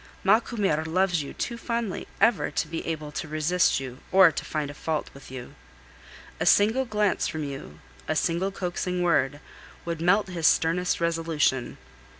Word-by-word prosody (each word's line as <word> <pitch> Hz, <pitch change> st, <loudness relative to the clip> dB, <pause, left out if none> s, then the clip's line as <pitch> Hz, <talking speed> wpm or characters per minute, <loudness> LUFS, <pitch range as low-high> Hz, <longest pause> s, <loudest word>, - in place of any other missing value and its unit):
Macumer 200 Hz, -6 st, +2 dB
loves 175 Hz, +1 st, +1 dB
you 140 Hz, -, -7 dB
too 235 Hz, -1 st, -4 dB
fondly 235 Hz, -5 st, -3 dB
ever 225 Hz, -3 st, +3 dB
to -, -, -2 dB
be 165 Hz, +1 st, -4 dB
able 155 Hz, -2 st, -3 dB
either 150 Hz, -, -16 dB
to 160 Hz, -, -4 dB
resist 155 Hz, +3 st, +2 dB
you 130 Hz, -1 st, -7 dB
or 185 Hz, -2 st, +7 dB
find 145 Hz, -1 st, -4 dB
fault 155 Hz, 0 st, -3 dB
with 140 Hz, -, -13 dB
you. 130 Hz, -2 st, -8 dB, 0.9 s
A -, -, 0 dB
single 220 Hz, +6 st, +4 dB
glance 210 Hz, -3 st, +1 dB
from 155 Hz, -1 st, -4 dB
you, 135 Hz, -, -7 dB, 0.3 s
a -, -, 0 dB
single 170 Hz, +3 st, 0 dB
coaxing 180 Hz, -1 st, -2 dB
word, 145 Hz, -4 st, +2 dB, 0.5 s
would 170 Hz, -1 st, -3 dB
melt 195 Hz, +5 st, +4 dB
his 170 Hz, -3 st, +1 dB
sternest 175 Hz, +2 st, +2 dB
resolution. 165 Hz, -6 st, 0 dB
170 Hz, 155 wpm, -26 LUFS, 150-190 Hz, 0.9 s, or